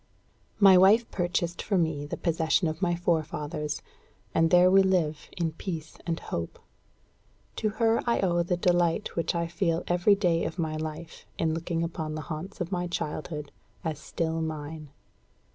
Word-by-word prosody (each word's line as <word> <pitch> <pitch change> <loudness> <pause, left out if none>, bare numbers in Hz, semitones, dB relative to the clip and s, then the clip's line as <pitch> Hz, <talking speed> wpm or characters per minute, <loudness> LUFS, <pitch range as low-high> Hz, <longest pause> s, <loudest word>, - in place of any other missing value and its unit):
My 195 -3 +8
wife 215 +5 +6
purchased 175 -1 -1
for 200 - 0
me 160 -4 0
the - - -4
possession 165 +1 +1
of 155 +2 -4
my 175 -2 +2
forefathers, 155 -3 -2 0.5
and 165 0 +3
there 180 +1 +6
we 195 +1 +7
live 175 -6 0
in 170 -2 0
peace 160 -1 -6
and 165 -1 -1
hope. 85 0 -5 1.0
To 215 - +1
her 230 0 +3
I 235 - +2
owe 175 -3 +2
the 175 +1 0
delight 175 +2 +1
which 165 0 0
I 170 0 0
feel 170 0 -1
every 175 +4 +4
day 175 -4 +1
of - - -4
my 160 -3 -1
life 155 +1 -6
in 160 -1 +1
looking 165 0 -2
upon 160 -2 -4
the 155 - -4
haunts 185 +7 -7
of 175 0 -3
my 180 -1 -1
childhood 150 -2 -4 0.3
as 155 -3 -3
still 160 +1 -2
mine. 155 -1 -5
170 Hz, 165 wpm, -28 LUFS, 155-180 Hz, 1.0 s, My